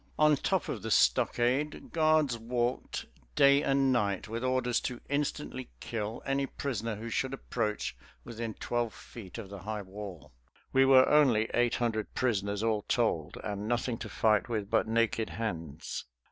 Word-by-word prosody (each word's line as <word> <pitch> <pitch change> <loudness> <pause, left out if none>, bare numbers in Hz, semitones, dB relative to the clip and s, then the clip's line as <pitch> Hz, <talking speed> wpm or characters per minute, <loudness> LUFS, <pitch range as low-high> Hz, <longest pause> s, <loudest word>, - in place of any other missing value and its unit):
On 150 -1 +5
top 190 +6 0
of 110 - -4
the 110 - -4
stockade 120 - +2
guards 155 -5 +3
walked 120 +2 -2 0.3
day 140 +1 +6
and 135 -1 +2
night 100 -6 0
with 115 +3 -4
orders 130 -1 +1
to 125 -2 -4
instantly 145 -2 -2
kill 110 0 -4
any 135 0 0
prisoner 115 -6 -3
who 110 +3 -7
should 130 +3 -1
approach 105 - -2 0.3
within 115 -2 -5
twelve 120 -2 -2
feet 105 -5 -10
of 105 -4 -7
the 100 - -7
high 105 +2 -4
wall. 95 -7 -9 0.4
We 135 0 +6
were 130 -1 +7
only 125 -8 +4
eight 120 0 +2
hundred 115 -3 -2
prisoners 100 -4 0
all 110 -2 +1
told, 105 -10 0
and 105 0 -4
nothing 120 0 -1
to - - -6
fight 110 0 +2
with 105 -3 -2
but - - +3
naked 115 0 +1
hands. 85 -9 -4
115 Hz, 160 wpm, -30 LUFS, 105-130 Hz, 0.4 s, were